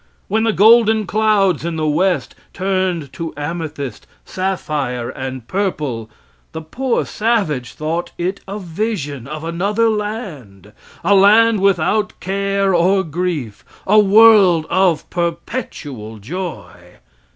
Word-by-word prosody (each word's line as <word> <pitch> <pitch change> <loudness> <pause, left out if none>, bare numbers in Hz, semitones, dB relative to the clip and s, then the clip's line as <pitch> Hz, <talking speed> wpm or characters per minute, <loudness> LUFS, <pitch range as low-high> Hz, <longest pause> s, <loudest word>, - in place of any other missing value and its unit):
When 220 +3 +1
the 225 - +3
golden 220 0 +5
clouds 205 -5 +2
in 170 0 -3
the 155 -1 -2
west 180 +5 0 0.2
turned 185 -6 -2
to 165 -2 -6
amethyst, 145 -5 -5 0.2
sapphire, 150 -10 -3
and 130 -3 -7
purple, 150 - -2 0.4
the 160 - -5
poor 250 +10 -1
savage 200 - -1
thought 165 +3 -3
it 185 +3 -2
a 200 +2 -5
vision 165 - -4
of 155 +2 -7
another 200 +7 0
land 155 - -6 0.3
a 195 +4 +3
land 215 +3 +5
without 200 +3 +1
care 195 0 0
or 185 +3 +3
grief 160 - -4 0.2
a 210 +2 +5
world 205 -5 +6
of 185 -4 +2
perpetual 160 - -4
joy. 125 - -6
180 Hz, 120 wpm, -18 LUFS, 150-205 Hz, 0.4 s, world